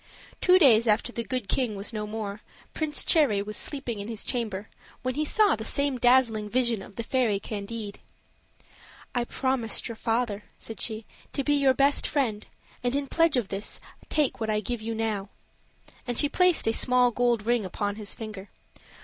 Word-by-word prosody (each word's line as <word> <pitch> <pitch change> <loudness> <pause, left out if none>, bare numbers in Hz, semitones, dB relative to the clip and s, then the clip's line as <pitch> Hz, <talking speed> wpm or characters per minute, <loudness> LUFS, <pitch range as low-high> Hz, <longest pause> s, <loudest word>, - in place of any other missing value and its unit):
Two 365 0 +6
days 240 -9 +6
after 220 +3 +2
the 235 - -3
Good 250 -3 -3
King 235 -1 0
was 200 +4 -4
no 210 -1 -3
more, 210 -1 -5 0.3
Prince 305 -2 +1
Cherry 280 -11 +4
was 210 +1 -6
sleeping 260 -7 -3
in 200 - -5
his 225 -2 -2
chamber, 215 -5 -2 0.4
when 255 0 -1
he 300 +4 -1
saw 415 +7 +3
the 220 - -6
same 280 +2 0
dazzling 240 -4 +3
vision 235 -3 +1
of 195 - -12
the 230 - -4
fairy 225 -4 +1
Candide. 205 0 -6 1.1
"I 245 -2 0
promised 260 -3 -1
your 230 - -6
father," 225 -2 -1
said 225 - -6
she, 220 -1 -1 0.3
"to 275 - -1
be 290 - +2
your 275 -2 +3
best 280 +2 +3
friend, 225 -8 -1 0.4
and 245 +2 0
in 285 0 0
pledge 330 0 +2
of 230 -6 -1
this 195 +2 -3 0.3
take 300 -3 +1
what 220 -1 -2
I 215 - +1
now 210 - 0
give 240 0 -2
you;" 225 0 -4 1.1
and 245 -1 -2
she 290 - +4
placed 360 +1 +3
a 225 - +3
small 250 0 +4
gold 240 -3 +1
ring 240 -1 +2
upon 205 +2 -3
his 210 -2 -4
finger. 215 -3 -8
235 Hz, 185 wpm, -27 LUFS, 215-260 Hz, 1.1 s, Two